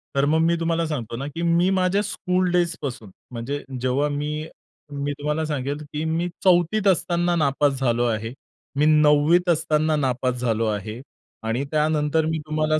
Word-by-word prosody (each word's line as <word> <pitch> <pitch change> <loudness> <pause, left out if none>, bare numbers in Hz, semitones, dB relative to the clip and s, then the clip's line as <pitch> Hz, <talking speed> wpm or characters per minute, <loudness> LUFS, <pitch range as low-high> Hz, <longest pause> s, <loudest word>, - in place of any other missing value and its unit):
तर 140 0 +3
मग 160 - +3
मी 170 - +3
तुम्हाला 165 0 0
सांगतो 120 -7 -4
ना, 140 +2 -4
की 165 +3 -6
मी 170 +2 +3
माझ्या 190 +2 +2
स्कूलडेजपासून 175 - -1 0.2
म्हणजे 125 +5 -4 0.2
जेव्हा 130 +3 +1
मी, 150 +2 -3 0.4
मी 145 0 -3
तुम्हाला 150 +2 -1
सांगेल 145 -1 -2 0.2
की 150 +1 -2
मी 165 +2 0 0.2
4थीत 185 +3 +3
असताना 175 -1 +2
नापास 140 -2 +1
झालो 120 -2 +1
आहे. 115 0 -2 0.4
मी 145 +2 +2
9वीत 155 +3 +4
असताना 155 -1 +2
नापास 130 -2 0
झालो 115 -2 0
आहे. 105 +3 -4 0.4
आणि 115 +4 -1
त्यानंतर 155 0 +1
मी 160 0 -1
तुम्हाला 155 0 +1
150 Hz, 155 wpm, -23 LUFS, 135-170 Hz, 0.4 s, 9वीत